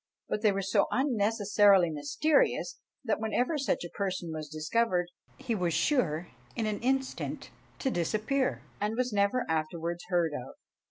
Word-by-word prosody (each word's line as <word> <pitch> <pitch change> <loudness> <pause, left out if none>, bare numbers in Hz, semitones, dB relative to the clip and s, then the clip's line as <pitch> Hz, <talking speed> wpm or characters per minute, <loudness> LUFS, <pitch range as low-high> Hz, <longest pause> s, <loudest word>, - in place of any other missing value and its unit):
but 210 - -2
they 215 -2 +4
were 195 0 -2
so 195 - +2
unnecessarily 205 - +3
mysterious, 215 - +1 0.2
that 225 -4 0
whenever 245 +7 0
such 280 -9 0
a 175 - -6
person 185 -4 -2
was 155 -1 -6
discovered, 175 +3 0 0.3
he 235 - -3
was 175 -6 0
sure 175 - +1 0.3
in 225 - -1
an 210 -1 -1
instant 265 +2 -2 0.3
to 265 - -1
disappear, 215 - 0 0.2
and 210 +2 -1
was 250 -2 0
never 200 +5 +2
afterwards 165 +2 -2
heard 175 -3 +2
of. 130 -2 -6
200 Hz, 150 wpm, -30 LUFS, 170-235 Hz, 0.3 s, they